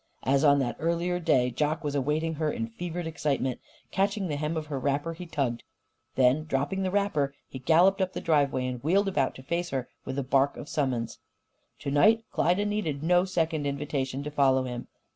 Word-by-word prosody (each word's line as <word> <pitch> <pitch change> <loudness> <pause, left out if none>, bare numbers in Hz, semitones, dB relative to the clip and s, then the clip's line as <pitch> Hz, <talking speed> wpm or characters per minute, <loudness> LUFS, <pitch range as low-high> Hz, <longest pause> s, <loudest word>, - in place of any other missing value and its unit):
As 135 +2 +2
on 145 -1 +6
that 130 -3 -1
earlier 170 +2 0
day, 130 -7 +2
Jock 150 +6 -1
was 145 -1 -2
awaiting 150 +4 0
her 155 -1 +1
in 115 - -2
fevered 175 +7 -5
excitement. 140 -5 -1 0.3
Catching 195 -1 0
the 150 - -1
hem 150 +3 -2
of 155 - -3
her 145 -3 -4
wrapper, 145 +5 -1
he 175 +2 -9
tugged. 135 -7 -1 0.5
Then, 130 +4 +3
dropping 155 +6 -1
the 190 - 0
wrapper, 170 -9 0
he 130 - -8
galloped 175 +8 +4
up 185 0 0
the - - -3
driveway 140 -5 +1
and 125 -1 -4
wheeled 195 +6 +3
about 145 -9 0
to 130 - -11
face 170 +5 -2
her 130 -2 -3
with 130 - -5
a 140 - 0
bark 135 +2 +2
of - - -8
summons. 130 -7 -2 0.6
To 140 - -3
night 215 +11 +5
Klyda 180 +5 +2
needed 190 -9 -2
no 180 +2 +4
second 160 -5 0
invitation 140 -1 -2
to 150 - -5
follow 135 -2 +3
him. 125 -1 -5
150 Hz, 200 wpm, -28 LUFS, 135-170 Hz, 0.6 s, on